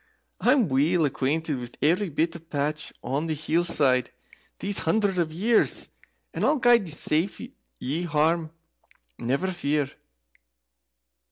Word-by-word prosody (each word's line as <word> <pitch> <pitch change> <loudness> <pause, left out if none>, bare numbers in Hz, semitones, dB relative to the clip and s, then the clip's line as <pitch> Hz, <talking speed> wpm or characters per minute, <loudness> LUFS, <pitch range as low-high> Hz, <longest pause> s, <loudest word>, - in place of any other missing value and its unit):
I'm 250 -4 +3
weel 155 +5 +2
acquaint 145 +4 -1
with 125 -4 -4
every 175 +7 +2
bit 165 +2 -2
path 150 +1 -2
on 145 +5 -2
the 160 - -1
hill 160 +3 0
side 135 -7 +2 0.5
these 200 0 +2
hundreds 195 +2 +1
of 165 -2 0
years, 215 +8 +2 0.4
and - - -3
I'll 310 - +3
guide 240 -6 +4
ye 155 - 0
safe 160 +6 +1 0.7
hame, 160 +2 +1 0.7
never 135 +9 -1
fear!" 145 -5 -1
160 Hz, 120 wpm, -25 LUFS, 145-180 Hz, 0.7 s, guide